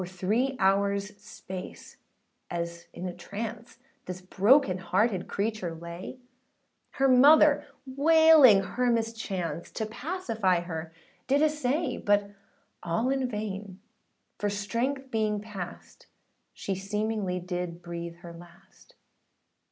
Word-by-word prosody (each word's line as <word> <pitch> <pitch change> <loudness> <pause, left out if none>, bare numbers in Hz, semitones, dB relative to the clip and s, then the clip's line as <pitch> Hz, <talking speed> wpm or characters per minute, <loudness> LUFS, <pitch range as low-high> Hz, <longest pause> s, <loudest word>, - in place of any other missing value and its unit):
For 180 - -5
three 215 +9 -1
hoursâ 200 +1 +1
space, 190 -3 -9 0.5
as 170 0 -5
in 180 - -7
a 180 - -5
trance, 225 +5 -7 0.3
This 180 0 -5
broken 195 +2 +3
hearted 190 +2 0
creature 200 -5 -2
lay, 170 +8 -8 0.8
Her 270 - +2
mother 285 +3 +6 0.2
wailing 290 -5 +6
her 245 +6 -1
mischance, 225 -7 -2
To 220 - -4
pacify 225 - -1
her 165 -2 -6 0.4
did 280 +3 +3
essay: 300 0 0
But 205 0 +1 0.5
all 175 +10 0
in 265 -2 0
vain, 205 -3 -5 0.6
for 205 - 0
strength 240 +7 -2
being 215 -2 0
past, 200 -4 -9 0.4
She 195 - -4
seemingly 200 -1 -2
did 180 -1 -5
breathe 170 -1 -6
her 170 -1 -9
last. 175 +3 -17
205 Hz, 115 wpm, -28 LUFS, 180-245 Hz, 0.8 s, mother